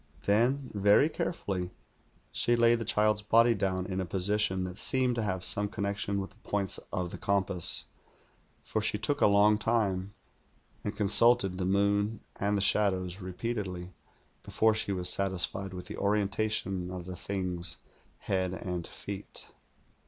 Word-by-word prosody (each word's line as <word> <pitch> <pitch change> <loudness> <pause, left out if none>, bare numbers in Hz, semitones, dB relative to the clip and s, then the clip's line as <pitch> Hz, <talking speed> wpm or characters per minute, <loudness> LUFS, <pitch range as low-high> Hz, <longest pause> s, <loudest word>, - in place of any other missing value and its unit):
Then, 125 +6 +1
very 105 +8 +4
carefully, 95 - -3 0.6
she 120 - +2
laid 120 0 +3
the 115 - -4
child's 105 +1 +2
body 115 +3 +4
down 95 -3 -2
in 95 0 -3
a - - -3
position 95 +1 +1
that 90 +1 -6
seemed 130 -1 +2
to 120 - -2
have 95 -4 -2
some 105 +2 +7
connection 100 -1 -3
with 95 - -6
the - - -22
points 100 -2 -3
of 90 -1 -3
the - - -8
compass, 95 -3 +3 0.8
for 110 - -2
she 105 0 0
took 145 +7 -1
a - - +6
long 105 +1 +4
time, 100 -4 -1 0.7
and 105 0 -5
con 105 -2 0
sulted 110 -3 +4
the 90 - -1
moon 100 +3 +1 0.2
and 100 +1 0
the - - 0
shadows 95 -2 +1
repeatedly 95 -2 -5 0.5
before 110 0 +1
she 105 -2 -2
was 90 -2 -1
satisfied 95 0 0
with 90 -1 -8
the - - -8
orientation 100 -2 -1
of 90 -1 -7
the 90 0 -7
thing's 90 -1 -3 0.4
head 95 -1 -1
and 90 -3 -5
feet. 100 0 -7
100 Hz, 155 wpm, -29 LUFS, 95-105 Hz, 0.8 s, some